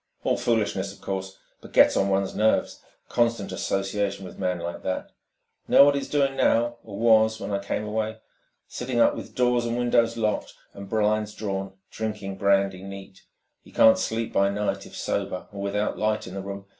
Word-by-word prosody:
"All - - +2
foolishness, 100 -4 0
of 100 - -15
course, 95 0 -5 0.2
but - - -14
'gets - - +6
on 95 - +2
one's 95 0 0
nerves... 110 +1 +1 0.3
constant 115 -4 0
association 100 0 -2
with - - -11
man 90 -1 0
like 85 0 -5
that.... 95 - -3 0.6
'Know 140 - +8
what 145 - +4
he's 140 - -3
doing 140 -2 +1
now, 120 -2 +2
or 100 -3 -9
was, 110 -1 +4
when - - -5
I 100 - 0
came 100 +1 -3
away? 110 +1 -2 0.5
Sitting 125 -1 -3
up - - +5
with - - -9
doors 120 -1 +2
and 115 +1 -1
windows 115 -1 +2
locked 110 -2 -1 0.2
and 100 -1 -9
blinds 105 -1 0
drawn, 95 -2 -4 0.2
drinking 105 -3 -4
brandy 100 -2 +2
neat. 95 -1 -10 0.4
He - - -18
can't 110 - +6
sleep 115 0 -2
by 100 0 +3
night 105 +1 -2
if - - -13
sober, 100 -2 -2
or 100 -1 -7
without 100 +1 -1
'light 110 0 0
in 95 - -9
the 95 - -4
room. 100 0 -7
105 Hz, 185 wpm, -25 LUFS, 100-115 Hz, 0.6 s, Know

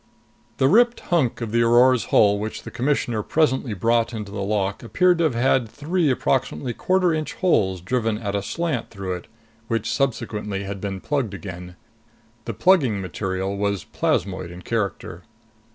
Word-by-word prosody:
The 130 - +3
ripped 240 - +4
hunk 140 -9 +1
of 115 -2 -3
the 115 +1 +2
Aurora's 120 +1 +5
hull 100 -1 +4
which 110 +1 -5
the - - -8
Commissioner 120 -4 0
presently 130 -4 +1
brought 115 +4 +1
into 105 -2 -6
the 100 -1 -4
lock 100 -1 -1
appeared 180 +8 +2
to 170 - +3
have 145 -7 0
had 120 -1 +2
three 155 +5 0
approximately 120 - 0
quarter 185 +4 +2
inch 155 -1 -3
holes 95 - +1
driven 115 +2 -1
at 100 -3 -4
a 100 - 0
slant 155 - -2
through 95 -3 -4
it, 90 - -7 0.4
which 115 0 -1
subsequently 105 -5 -2
had 100 0 -6
been 95 -2 -4
plugged 130 -7 -1
again. 90 -2 -8 0.7
The 115 - -4
plugging 130 - +3
material 95 +1 -3
was 100 -2 -1
plasmoid 95 -1 -1
in 90 +1 -10
character. 110 -4 -3
115 Hz, 165 wpm, -23 LUFS, 100-130 Hz, 0.7 s, Aurora's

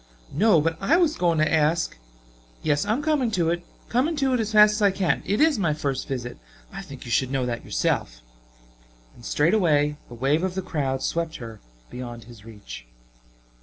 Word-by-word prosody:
"No, 200 +2 +4
but 165 +1 -1
I 325 - +3
was 330 -3 +2
going 170 -2 +1
to 155 0 +2
ask 160 +1 +1 0.3
" - - -30
"Yes, 145 +3 +1
I - - +1
am 275 +6 -2
coming 290 -6 +1
to 165 -2 +2
it, 175 0 -2 0.2
coming 270 +8 +1
to 270 -3 +1
it 250 - +1
as 220 -1 -2
fast 210 0 +7
as 210 - -3
I 200 - +5
can. 185 -6 0
It 205 - 0
is 310 -6 +3
my 160 -6 +1
first 140 -3 -3
visit. 120 - -5 0.3
I - - -6
think 135 -2 -11
you 120 - -7
should 130 +2 +2
know 135 -2 -1
that 120 -1 -4
yourself." - - -1 0.9
And 120 - -17
straightway 150 - +2
a 120 - -9
wave 135 +6 +1
of 185 0 -2
the 190 - -2
crowd 135 -6 -2
swept 165 -1 -2
her 115 -3 -9 0.3
beyond 120 -2 -7
his 115 -3 -14
reach. 105 - -11
155 Hz, 205 wpm, -24 LUFS, 125-205 Hz, 0.9 s, fast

